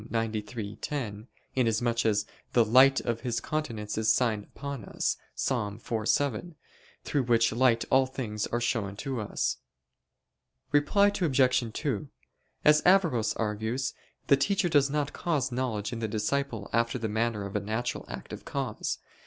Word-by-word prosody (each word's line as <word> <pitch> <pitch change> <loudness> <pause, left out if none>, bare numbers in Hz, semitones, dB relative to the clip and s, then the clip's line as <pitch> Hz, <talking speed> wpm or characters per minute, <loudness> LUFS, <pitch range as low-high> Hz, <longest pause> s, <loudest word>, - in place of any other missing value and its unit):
93:10), 110 +1 -3 0.3
inasmuch 115 -1 +1
as 105 -1 +2 0.3
"the 120 -2 +5
light 130 +4 +6
of 115 -1 -2
His 120 -3 -1
countenance 115 -10 -3
is 110 - +3
signed 110 -5 +1
upon 140 -5 -7
us" - - -1 0.2
(Ps. - - -1
4:7), 115 +8 -1 0.5
through 145 - 0
which 115 -2 +3
light 115 -1 +3
all 130 0 +5
things 110 -5 -3
are 120 - -1
shown 110 -5 -1
to 130 +3 -3
us. 105 - -1 1.1
Reply 175 +8 +4
Obj. 130 - +2
2: 140 +1 -2 0.6
As 150 0 +6
Averroes 170 - +3
argues, 110 +5 -2 0.3
the 140 - +6
teacher 190 +5 +1
does 145 -3 +4
not 145 0 -1
cause 145 -7 -1
knowledge 120 -4 -2
in 115 - -4
the 110 - -1
disciple 110 +1 -1
after 115 +2 +1
the 115 -2 -2
manner 110 -1 -1
of 100 - -7
a - - +2
natural 110 +4 -3
active - - -7
cause. - - -3
120 Hz, 145 wpm, -29 LUFS, 110-140 Hz, 1.1 s, light